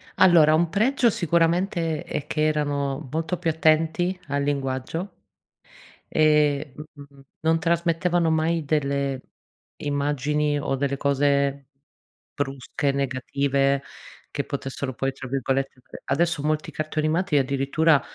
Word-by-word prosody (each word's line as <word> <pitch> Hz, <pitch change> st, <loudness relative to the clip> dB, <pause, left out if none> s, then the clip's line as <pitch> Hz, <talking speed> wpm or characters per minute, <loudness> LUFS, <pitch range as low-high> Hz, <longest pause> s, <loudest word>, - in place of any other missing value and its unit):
Allora, 160 Hz, -4 st, +6 dB
un 165 Hz, +1 st, +2 dB
pregio 235 Hz, +4 st, +2 dB
sicuramente 170 Hz, -2 st, +1 dB
è 150 Hz, -, -5 dB
che 155 Hz, 0 st, 0 dB
erano 145 Hz, -2 st, -1 dB
molto 165 Hz, +3 st, -2 dB
più 170 Hz, -2 st, -1 dB
attenti 160 Hz, +3 st, +2 dB
al 140 Hz, 0 st, -1 dB
linguaggio 140 Hz, +6 st, -2 dB, 1.1 s
ehm, 150 Hz, -2 st, +3 dB
mh, 150 Hz, -, -7 dB, 0.2 s
mh-mh, 140 Hz, -1 st, -15 dB, 0.2 s
non 160 Hz, +1 st, +2 dB
trasmettevano 170 Hz, 0 st, +1 dB
mai 160 Hz, 0 st, +1 dB
delle 140 Hz, -2 st, 0 dB, 0.6 s
immagini 145 Hz, +1 st, 0 dB
o 135 Hz, -, -1 dB
delle 140 Hz, 0 st, -1 dB
cose 140 Hz, -1 st, +1 dB, 0.7 s
brusche, 140 Hz, 0 st, -2 dB
negative 140 Hz, +1 st, 0 dB, 0.5 s
che 140 Hz, -, -3 dB
potessero 135 Hz, -1 st, -4 dB
poi 135 Hz, +2 st, -1 dB
tra 135 Hz, -1 st, -9 dB
virgolette 135 Hz, 0 st, -2 dB
ade -, -, -12 dB
adesso 165 Hz, +3 st, +1 dB
molti 155 Hz, +1 st, -1 dB
cartoni 155 Hz, 0 st, -2 dB
animati 160 Hz, -1 st, +1 dB
addirittura, 140 Hz, +3 st, +2 dB
150 Hz, 120 wpm, -24 LUFS, 140-160 Hz, 1.1 s, Allora